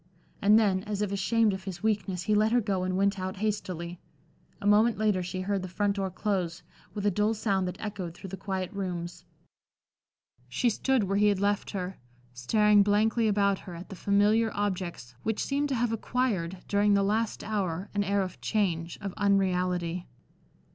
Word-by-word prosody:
And 210 +2 +6
then, 200 -4 +3
as 210 -1 -2
if 200 - -2
ashamed 210 +2 +2
of 190 0 -6
his 190 0 -6
weakness, 195 -4 0
he 215 - +1
let 215 +1 +3
her 245 - +4
go 200 -4 -1
and 185 0 -1
went 200 0 +1
out 185 0 -4
hastily. 180 -5 -3 0.6
A - - -8
moment 215 +2 +4
later 210 -3 +2
she 180 +1 -4
heard 195 +1 -1
the 185 - -5
front 200 +2 -1
door 195 -1 -1
close, 185 -3 -2 0.3
with 205 -1 -3
a 205 - +4
dull 210 +4 +1
sound 195 -3 0
that 180 - -6
echoed 190 -5 -5
through 190 +1 -9
the - - -3
quiet 190 -2 -4
rooms. 175 -3 -5 1.2
She 240 - +1
stood 265 +1 +1
where 195 +1 0
he 210 +1 +4
had 200 -2 +2
left 205 0 0
her, 185 -1 -5 0.3
staring 210 - +4
blankly 215 +3 +2
about 200 -2 +2
her 180 -3 -9
at 170 +2 -9
the 195 - -7
familiar 205 +4 +3
objects 185 -10 -3
which 220 -1 -1
seemed 285 +1 0
to 270 - 0
have 240 -1 +1
acquired, 205 -7 -1
during 205 0 +3
the 200 - +3
last 215 +2 0
hour, 195 -3 -2
an 205 0 +1
air 200 0 +1
of 185 -1 -7
change, 170 -6 -1
of 195 -2 -4
unreality. 180 -3 +1
200 Hz, 190 wpm, -28 LUFS, 185-210 Hz, 1.2 s, And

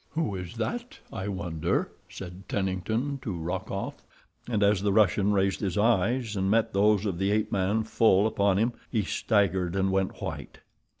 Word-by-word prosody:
"Who 155 -10 -1
is 90 0 -6
that, 235 - -4 0.2
I 95 +1 -4
wonder," 85 -5 -1 0.2
said 95 +1 -9
Tennington 105 +9 -1
to 100 -7 -4
Rokoff, 85 +2 -4 0.5
and 105 -3 +1
as 100 -1 +3
the 100 0 +1
Russian 100 -1 +3
raised 95 -1 +1
his 95 -3 -2
eyes 115 +2 +2
and 95 0 0
met 115 +1 +2
those 105 +1 +3
of 95 -4 -2
the 95 +1 +1
ape 105 +1 +1
man 100 +3 +1
full 110 -2 +3
upon 100 -3 +2
him, 115 +4 +1 0.2
he 110 -4 +1
staggered 95 -3 +1
and 95 0 +1
went 95 -1 -1
white. - - -6
100 Hz, 170 wpm, -27 LUFS, 95-110 Hz, 0.5 s, as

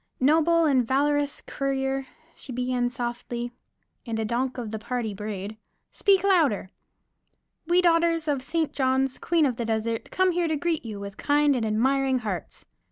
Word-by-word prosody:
"Noble 325 +4 +4
and 270 -5 +3
valorous 285 +3 +1
courtier," 270 -1 -2 0.3
she 265 - -9
began 250 0 0
softly 240 0 -4 0.5
and 230 -2 -4
a 220 - -1
donk 250 +4 -1
of 230 -4 -5
the 220 - -4
party 230 -1 -3
brayed, 210 0 -6 0.3
"Speak 390 -2 +3
louder!" 310 - +2 1.0
"we 355 +1 +4
daughters 330 -1 +3
of 285 -3 0
St. 320 +3 -1
Johns, 265 -1 +1
Queen 335 -3 +2
of 250 -4 0
the 235 - -2
Desert, 225 0 -2
come 370 -1 +2
to 335 -2 +1
greet 325 +1 -1
you 215 -3 -6
with 200 0 -8
kind 290 -1 +3
and 230 -3 0
admiring 265 +4 +2
hearts." 210 -8 -5
265 Hz, 160 wpm, -26 LUFS, 230-305 Hz, 1.0 s, Noble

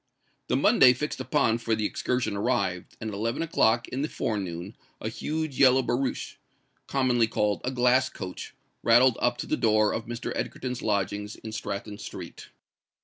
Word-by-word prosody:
The - - +1
Monday 125 - +6
fixed 150 +5 -4
upon 115 -6 +1
for 115 -1 0
the 110 -1 -1
excursion 125 -2 -1
arrived; 100 -5 -1
and 110 -1 -4
at - - -8
eleven 115 +8 -1
o'clock 120 -7 +2
in 130 - -3
the 150 - -1
forenoon 95 -3 -3 0.2
a 110 - -3
huge 155 +4 -3
yellow 130 -1 +6
barouche, 130 +2 -2 0.5
commonly 125 -4 +2
called 105 -2 0
"a 125 - -1
glass 130 0 +3
coach," 90 -1 -8 0.3
rattled 120 +1 +5
up 120 0 +2
to - - -4
the - - 0
door 110 -1 +3
of 110 - -4
Mr. 120 +1 -4
Egerton's 125 -1 -4
lodgings 105 0 -1
in 110 - -9
Stratton 105 -1 -5
Street. - - -9
115 Hz, 165 wpm, -27 LUFS, 105-130 Hz, 0.5 s, Monday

